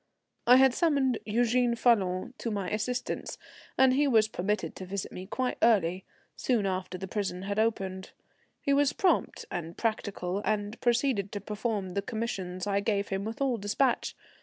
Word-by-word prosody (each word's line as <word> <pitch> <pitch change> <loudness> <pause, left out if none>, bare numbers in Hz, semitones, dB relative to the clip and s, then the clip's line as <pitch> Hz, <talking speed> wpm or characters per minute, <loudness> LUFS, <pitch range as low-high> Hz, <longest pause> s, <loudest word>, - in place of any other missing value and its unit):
I 250 - +9
had 265 -1 +6
summoned 275 -7 +2
Eugène 240 +2 +2
Falloon 195 -3 +2
to 230 - -2
my 200 -4 -3
assistance, 245 +4 -3 0.4
and 260 -1 +6
he 285 +2 +3
was 220 -5 +4
permitted 210 0 -2
to 190 - -6
visit 195 0 -4
me 185 +1 -8
quite 255 +4 -2
early, 190 -5 +3 0.3
soon 235 -6 +1
after 185 -1 -2
the 190 +1 -6
prison 190 -2 -3
had 200 +2 -2
opened. 190 -4 -1 0.5
He 280 - +2
was 285 0 +3
prompt 375 - +1
and 170 0 -5
practical, 205 -4 -2
and 210 +1 -2
proceeded 240 -5 +1
to 205 - -2
perform 210 -1 -3
the 200 - -1
commissions 195 -5 -4
I 200 -1 +1
gave 200 -1 0
him 195 +1 -2
with 225 +4 -6
all 260 -3 +1
despatch. 225 +5 0
210 Hz, 165 wpm, -29 LUFS, 195-245 Hz, 0.5 s, I